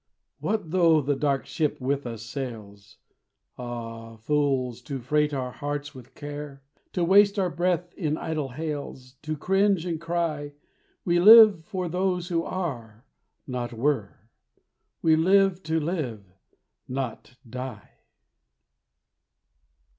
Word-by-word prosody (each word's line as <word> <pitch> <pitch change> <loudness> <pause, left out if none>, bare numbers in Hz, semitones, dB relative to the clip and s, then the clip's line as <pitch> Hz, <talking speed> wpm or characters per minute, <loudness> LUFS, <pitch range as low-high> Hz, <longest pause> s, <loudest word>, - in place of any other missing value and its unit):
What 205 -7 -2
though 165 -3 +5
the 145 +1 0
dark 140 -1 0
ship 155 -3 -1
with 135 0 -1
us 115 -2 -6
sails 115 -5 -8 0.6
Ah, 115 -2 -7
fools, 130 -1 0
to 135 +2 -5
freight 150 +4 +1
our 130 -3 -3
hearts 145 +1 -4
with 130 -1 -14
care! 145 -1 -8 0.3
To 180 - 0
waste 200 +3 +5
our 185 -2 +1
breath 175 0 -1
in 155 -5 -2
idle 155 -4 -3
hails, 140 -3 -6
To 155 0 -4
cringe 195 +1 +2
and 165 -3 -3
cry. 165 -4 -2 0.5
We 175 0 +3
live 215 -2 +9
for 185 0 -3
those 180 0 -1
who 170 -2 +1
are, 120 - -5 0.4
not 125 -2 -4
were! 115 -3 -1 0.9
We 160 -1 +5
live 190 +2 +3
to 160 0 +2
live, 150 - -3 0.6
not 130 -1 -5
die! 125 -2 -7
145 Hz, 125 wpm, -26 LUFS, 125-175 Hz, 0.9 s, live